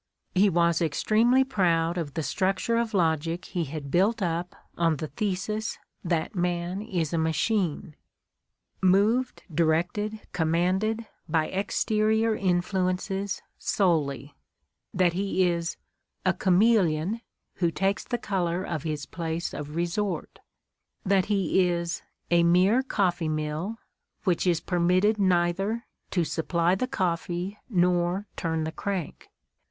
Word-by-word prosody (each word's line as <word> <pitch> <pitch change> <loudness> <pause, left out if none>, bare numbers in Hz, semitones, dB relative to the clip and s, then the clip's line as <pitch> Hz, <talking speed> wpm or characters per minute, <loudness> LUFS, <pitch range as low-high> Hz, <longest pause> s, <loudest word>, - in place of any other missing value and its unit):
He 200 +2 +5
was 170 -1 +2
extremely 225 - +3
proud 175 -9 +1
of 160 -5 -4
the 160 - -1
structure 195 +7 0
of 230 -2 0
logic 165 -1 +1
he 175 -2 -2
had 140 -1 -6
built 205 +6 +3
up 175 -1 -2 0.2
on 165 -2 +2
the 155 +2 -5
thesis 210 +1 -2 0.3
that 170 -1 -1
man 175 +1 -1
is 175 -8 -2
a 165 - +1
machine, 160 0 0 0.9
"moved, 210 +7 +2
directed, 175 +7 +1
commanded 185 +7 +1 0.2
by 155 0 +1
exterior 215 +3 +1
in 185 -4 +1
fluences, 190 +1 -2 0.2
solely," 145 -7 0 0.6
that 180 -2 +2
he 190 0 +1
is 170 -1 -1 0.5
"a - - +4
chameleon, 190 -1 +2 0.4
who 175 -2 +2
takes 195 +4 0
the 240 - -2
color 185 -5 -1
of 155 -5 -3
his 150 -2 -3
place 165 +2 -4
of 150 +1 -6
resort," 175 +3 -2 0.7
that 190 -1 +3
he 190 -2 +2
is 170 -1 -2 0.3
"a 170 0 +5
mere 180 +8 +4
coffee 180 -10 0
mill," 155 +7 -2 0.5
which 185 -2 +1
is 170 -3 +2
permitted 185 +4 +2
neither 190 +4 +1 0.2
"to 175 - +1
supply 170 +2 +1
the 225 +7 0
coffee 180 -3 -2
nor 180 0 +1
turn 160 -2 -1
the 160 - -3
crank." 190 -1 -4
180 Hz, 125 wpm, -27 LUFS, 165-200 Hz, 0.9 s, He